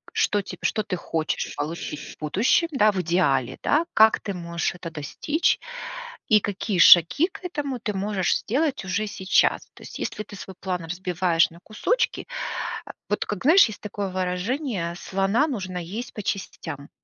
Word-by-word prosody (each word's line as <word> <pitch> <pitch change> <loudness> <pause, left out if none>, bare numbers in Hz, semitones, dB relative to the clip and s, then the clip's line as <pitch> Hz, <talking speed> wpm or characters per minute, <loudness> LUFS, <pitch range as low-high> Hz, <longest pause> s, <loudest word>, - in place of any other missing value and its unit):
что 210 - +2
теб - - -9
что 215 - +1
ты 200 -3 -3
хочешь 160 -2 -2
получить 150 -1 -5
будущем, 205 - +2
да, 215 -7 +4
в 190 -2 -1
идеале, 140 -7 +1
да? 320 +3 +3
Как 220 0 +6
ты 200 - -4
можешь 170 0 -2
это 170 -2 -7
достичь? 165 - 0 0.7
И 215 - +6
какие 200 0 -2
шаги 175 - +8
к 370 - -13
этому 285 -7 -3
ты 210 -2 -3
можешь 195 -1 +1
сделать 270 -2 -1
уже 205 +3 -1
сейчас. 190 -2 +2
То - - -17
есть - - -9
если - - -3
ты 205 - -12
свой 190 -1 -9
план 180 -2 -3
разбиваешь 175 -1 +1
на 170 - -15
кусочки, 480 - -1 0.6
а, - - -8 0.2
вот 210 - 0
как 205 +1 -4
знаешь, 335 +8 +7
есть 215 - -9
такое 205 -1 -4
выражение: 185 - -2
"Слона 195 - +1
нужно 190 - -4
есть 205 +9 -6
по 210 - -6
частям"? 195 -1 -5
195 Hz, 165 wpm, -24 LUFS, 175-225 Hz, 0.7 s, шаги